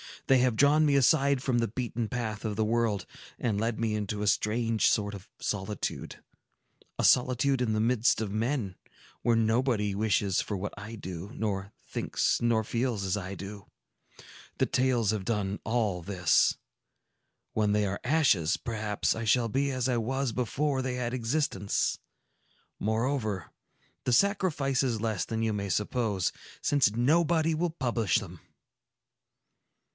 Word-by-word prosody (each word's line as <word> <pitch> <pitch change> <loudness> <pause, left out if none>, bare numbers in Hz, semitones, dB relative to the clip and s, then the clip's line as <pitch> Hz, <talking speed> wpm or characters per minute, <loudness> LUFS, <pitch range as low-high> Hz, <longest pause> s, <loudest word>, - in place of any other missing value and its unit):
They 135 -1 +5
have 125 -2 +2
drawn 145 +5 +5
me 145 -2 +3
aside 140 0 +3
from 125 -3 +1
the 115 - +1
beaten 120 0 -3
path 110 -2 -4
of 105 -1 -2
the 110 +1 +1
world, 115 -2 0 0.3
and 110 -4 -1
led 115 0 -1
me 115 -2 0
into 105 0 -2
a - - -1
strange 115 +2 +2
sort 105 -2 0
of 95 -2 -9
solitude,—a 105 0 -6
solitude 130 +1 +3
in 115 -3 +1
the 110 - +1
midst 120 0 +2
of 105 -3 -3
men, 110 -2 -1 0.5
where 120 - +3
nobody 115 -2 +1
wishes 100 -2 +1
for 105 - -4
what 100 +2 -4
I 110 +3 -7
do, 95 -1 -7
nor 100 -2 -3
thinks - - 0
nor 115 -2 +2
feels 115 -2 -1
as 95 +1 0
I 95 0 -5
do. 100 +1 -9 0.9
The - - +3
tales 125 -5 +1
have 105 -3 -3
done 100 -3 -1
all 110 -6 0
this. 90 0 +2 1.0
When 105 -1 +1
they 105 0 +2
are 100 0 -2
ashes, 125 - +3
perhaps 110 -3 -1
I 115 0 -4
shall 115 +1 +3
be 140 +5 0
as 130 -2 -1
I 125 - +1
was 130 +3 -1
before 130 +4 -1
they 130 -1 -2
had 125 -1 -2
existence. 115 -5 0 0.8
Moreover, 110 - -1 0.5
the 125 - +2
sacrifice 150 - +2
is 120 -5 -1
less 110 -4 -1
than 115 0 -2
you 110 - +1
may 100 -1 -3
suppose, 105 -1 0 0.3
since 135 -7 +2
nobody 160 +5 +3
will 170 +3 0
publish 120 - -1
them." - - -2
115 Hz, 150 wpm, -29 LUFS, 105-130 Hz, 1.0 s, They